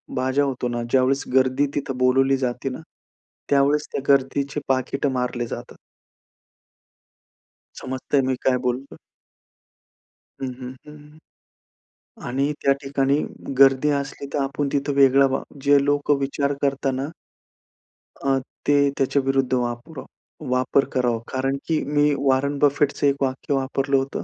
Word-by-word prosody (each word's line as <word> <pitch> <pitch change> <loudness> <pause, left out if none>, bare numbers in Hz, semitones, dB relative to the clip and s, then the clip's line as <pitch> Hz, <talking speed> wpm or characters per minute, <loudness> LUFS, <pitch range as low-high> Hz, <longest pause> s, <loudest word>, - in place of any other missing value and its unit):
बाजा 130 +2 +1
होतो 130 -3 -2
ना 120 0 -2
ज्यावेळेस 135 +1 +2
गर्दी 130 +2 +3
तिथं 135 -2 -3
बोलावली 135 +2 +3
जाते 130 +1 -2
ना, 125 - -6 0.7
त्यावेळेस 145 +2 +2
त्या - - -3
गर्दीचे 140 +2 0
पाकिटं 135 +2 0
मारले 125 -2 -2
जातात. - - -8 2.0
समजतंय 130 +2 -1
मी 130 - +1
काय 130 -1 +3
बोलतो 125 +2 -2
आहे? - - -19 1.4
हं, 130 -1 -3
हं, 130 0 -7
हं. 150 0 -14 1.1
आणि 135 +4 0
त्या 140 - +4
ठिकाणी 140 0 +1 0.4
गर्दी 135 +2 +5
असली 140 0 -6
तर - - -1
आपण 140 +1 -2
तिथं 140 +1 0
वेगळं 135 0 +5
व्हा. 135 - -1 0.2
जे 140 0 +4
लोकं 145 0 +2
विचार 140 +1 -1
करता 140 -1 0
ना 135 +2 -3 1.1
अ, 135 -1 +1 0.3
ते 145 - +4 0.2
त्याच्याविरुद्ध 135 -1 +1
वापरा 125 +3 -3 0.5
वापर 130 +2 +2
करावा. 120 -3 +1
कारण 135 +1 -1
की 160 -2 +1
मी 145 0 +2
वॉरेन 140 +1 +1
बफेटचं 145 0 +2
एक 140 - +3
वाक्य 135 +1 -1
वापरलं 135 0 0
होतं. 135 +1 -3
135 Hz, 130 wpm, -23 LUFS, 130-140 Hz, 2.0 s, गर्दी